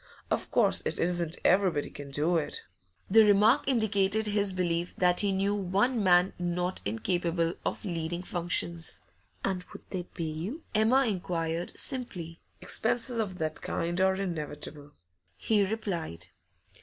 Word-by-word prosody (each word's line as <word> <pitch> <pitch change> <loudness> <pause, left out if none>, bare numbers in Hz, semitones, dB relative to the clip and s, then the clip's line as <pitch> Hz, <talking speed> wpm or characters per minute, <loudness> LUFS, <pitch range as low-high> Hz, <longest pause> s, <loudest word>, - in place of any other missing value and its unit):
Of - - -1
course, - - +3
it - - -1
isn't 175 -1 0
everybody 180 -6 +3
can 145 -1 -9
do 150 +5 +1
it.' 155 -3 -2 0.5
The 220 +2 +8
remark 210 +5 +4
indicated 220 -4 +2
his 205 -1 +2
belief 175 -2 -1
that 180 -1 +3
he 200 -1 +3
knew 195 +1 +1
one 205 +5 +1
man 180 0 +4
not 175 +1 -1
incapable 170 - 0
of - - -3
leading 170 -1 -3
functions. 170 -2 -1 0.4
'And 185 -2 -1
would - - -10
they 185 - -2
pay 175 -1 -7
you?' 165 - -4
Emma 240 +6 +4
inquired, 175 -5 -2
simply. 180 -11 -2 0.2
'Expenses 240 +1 0
of 195 -5 -2
that 155 -2 -3
kind 175 +2 -2
are 190 0 +4
inevitable,' 150 -5 -5 0.4
he 210 -2 +2
replied. 175 - -3
180 Hz, 140 wpm, -29 LUFS, 165-205 Hz, 0.5 s, The